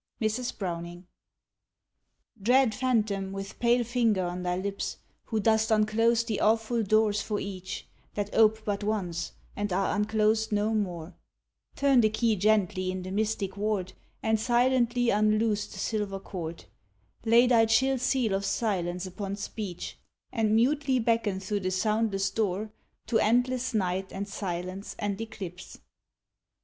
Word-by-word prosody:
Mrs. 225 +3 -1
Browning. 175 -1 -5 1.4
Dread 250 +2 +4
phantom, 215 -7 0
with 195 0 -7
pale 240 +1 +3
finger 230 -5 +1
on 175 +1 -3
thy 180 0 -1
lips, 200 +1 -3 0.3
Who 220 - -1
dost 220 +1 +2
unclose 225 +2 +3
the 225 -3 -2
awful 225 +2 +2
doors 215 0 +2
for 210 -2 -2
each, 185 -2 -6 0.3
That 205 0 -3
ope 220 0 +4
but 205 0 -2
once, 185 -5 -2 0.2
and 205 -1 -2
are 195 +3 +1
unclosed 215 +1 +1
no 210 +1 +1
more, 180 -5 -2 0.6
Turn 275 -3 +4
the 215 - +4
key 220 +1 +1
gently 200 -2 +2
in 185 0 -3
the 185 - -6
mystic 205 -2 -1
ward, 200 -3 -1 0.3
And 220 0 +2
silently 245 0 +2
unloose 215 0 +2
the - - -11
silver 205 -3 -2
cord; 170 -4 -7 0.6
Lay 230 +2 +6
thy 230 -2 +4
chill 265 +4 +3
seal 255 -4 +1
of 195 +1 0
silence 180 -5 -1
upon 195 +2 -5
speech, 200 -3 -6 0.3
And 220 -3 +2
mutely 265 +3 +2
beckon 225 -4 +1
through 200 +2 -2
the 185 -1 -2
soundless 205 +1 0
door 210 0 -1 0.3
To 225 - +2
endless 245 +3 +1
night, 190 -1 -1
and 200 +1 -4
silence 185 0 -5
and 205 0 -2
eclipse. 185 -5 -8
215 Hz, 140 wpm, -28 LUFS, 195-225 Hz, 1.4 s, Lay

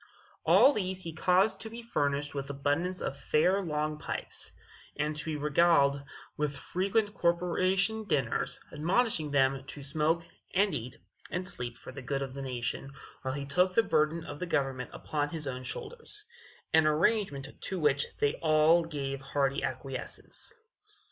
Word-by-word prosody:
All 285 - +7
these 185 -3 -2
he 165 - -5
caused 185 +6 +3
to 225 - -5
be 235 +1 -8
furnished 145 -9 0
with 140 -1 -4
abundance 145 +6 -1
of 140 - -3
fair 180 +8 +3
long 150 -3 -2
pipes, - - -4 0.5
and 150 +1 0
to 150 - -3
be 160 -1 -2
regaled 145 -1 +4 0.3
with 150 -2 -1
frequent 200 +8 0
corporation 185 +4 +1
dinners, 140 - 0
admonishing 165 +1 +1
them 135 -1 +2
to 140 0 -8
smoke, 155 +4 +1 0.3
and 200 0 +3
eat, 125 -3 -5 0.3
and 180 +1 -3
sleep 120 -6 -6
for - - -10
the 135 +1 -8
good 135 +2 -2
of 135 -1 -6
the 140 - -5
nation, 130 +1 -3 0.3
while 130 0 -2
he 140 -1 -4
took 180 +6 +2
the 230 - +6
burden 160 -1 +1
of 145 - -7
government 135 -4 0
upon 145 -1 -2
his 155 -1 -4
own 130 -2 -4
shoulders 420 - -3 0.5
an 160 -1 +6
arrangement 155 -2 +2 0.2
to 190 - -2
which 145 -2 +2
they 145 - +3
all 155 +2 +5
gave 140 -4 -4
hearty 135 0 0
acquiescence. 130 0 -5
150 Hz, 155 wpm, -30 LUFS, 140-180 Hz, 0.5 s, All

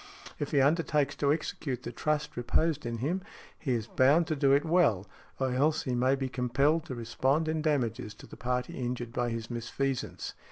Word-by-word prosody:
If 145 - -2
he 140 - +3
undertakes 150 0 +2
to 140 -1 +2
execute 140 -4 -2
the - - -5
trust 150 -1 -1
reposed 145 +4 0
in 115 0 -3
him, 160 +11 -1 0.4
he 135 -5 -1
is 115 -3 -1
bound 140 +8 +4
to 155 - +1
do 140 -1 +3
it 140 +1 +4
well, 150 - +3 0.3
or 130 -1 +1
else 150 +4 +2
he 130 -5 -2
may 130 +2 +3
be 135 -1 -2
compelled 135 +6 +1
to 130 - -5
respond 130 +6 0
in 160 0 0
damages 125 -8 -1
to - - -13
the - - -12
party 125 0 -2
injured 120 -1 -3
by 120 -1 0
his 115 -1 -4
misfeasance. 125 +3 -3
135 Hz, 195 wpm, -30 LUFS, 120-150 Hz, 0.4 s, bound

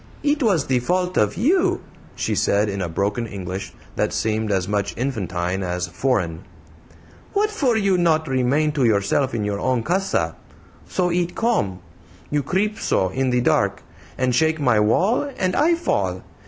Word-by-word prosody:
"It 295 +1 +1
was 195 - +2
the 130 -1 +1
fault 180 +7 0
of 105 +7 +1
you," 340 - +2 0.4
she - - -1
said, 105 +1 +2
in 100 -1 -3
a 90 - -2
broken 100 +7 -1
English 95 -1 -6 0.2
that - - 0
seemed 110 -1 -1
as 95 -1 0
much 100 0 -1
infantine 95 -7 -2
as 90 -1 -2
foreign. 90 -3 -1 0.9
"What 425 +1 +1
for 270 - +1
you 195 -4 +2
not 160 -2 +2
remain 135 +4 +1
to 145 -3 0
yourself 115 +4 +2
in 110 - -1
your 100 -1 -2
own 125 -1 0
CASA? 190 +7 0 0.5
So 180 -1 0
it 175 0 -1
come. 100 - 0 0.5
You 145 0 +1
creep 205 +9 -1
so 95 - +1
in 130 +6 -1
the 125 0 +2
dark - - +1 0.3
and 130 -1 +1
shake 160 +5 +2
my 125 -7 +3
wall, 195 - +2
and 185 -1 0
I 330 +4 +4
fall. 340 - -1
130 Hz, 165 wpm, -22 LUFS, -, 0.9 s, I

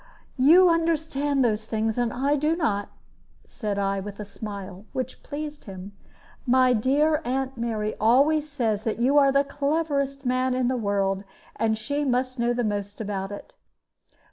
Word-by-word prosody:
"You 335 +8 +7
understand 315 -5 +1
those 215 -2 0
things, 220 0 -1
and 240 -2 0
I 275 +4 +1
do 300 +3 +1
not," 205 - -1 0.6
said 210 -5 -4
I, 195 0 0
with 200 +1 -8
a 210 - -5
smile, 200 -2 -8
which 255 0 -4
pleased 295 0 -7
him. 190 0 -8 0.6
"My 255 0 +5
dear 290 +7 +2
aunt 265 +1 -2
Mary 220 -3 -2
always 285 +7 +3
says 225 -7 -1
that 220 - -2
you 265 +5 +4
are 275 -1 +5
the 275 +1 +3
cleverest 280 -1 -1
man 255 +1 +1
in 255 -1 +1
the 260 - 0
world; 200 -3 0 0.3
and 220 -1 0
she 285 +6 -2
must 255 -1 -1
know 235 0 +2
most 205 -1 -3
about 200 -2 -3
it." 205 - -9
250 Hz, 160 wpm, -25 LUFS, 210-285 Hz, 0.6 s, You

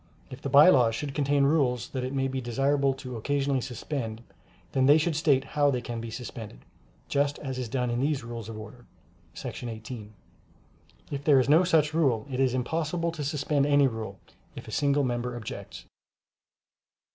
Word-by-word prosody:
If 130 +1 -9
the 140 - -3
By 140 +4 +8
Laws 120 -8 +4
should 140 +3 -4
contain 140 -1 +2
rules 130 -5 +1
that 130 -2 -4
it 130 - -3
may 135 -1 0
be 130 0 -3
desirable 135 +3 +1
to 130 -3 -7
occasionally 140 +2 0
suspend, 120 -2 -5 0.5
then 130 -1 +2
they 145 +2 +7
should 160 0 0
state 145 -4 +3
how 145 0 +1
they 130 -3 0
can 120 -1 -5
be 115 - -6
suspended, 110 - -8 0.4
just 140 0 0
as 130 -2 -5
is 125 -3 -4
done 125 0 -1
in 120 - -1
these 140 -1 0
Rules 115 -1 -7
of 110 - -7
Order, 120 +3 -11 0.5
§ 120 - -6
18. 110 -1 -8 1.0
If 140 -1 -4
there 145 -2 +5
is 130 - +1
no 155 +5 +6
such 155 -4 +2
rule 135 -9 +2
it 130 - -3
is 130 -2 +2
impossible 165 +6 -1
to 160 -3 -5
suspend 145 0 0
any 145 -1 +5
rule, 110 -6 -3 0.4
if - - -9
a - - -8
single 140 0 +2
member 120 -1 -2
objects. 120 -2 -8
135 Hz, 185 wpm, -27 LUFS, 120-145 Hz, 1.0 s, By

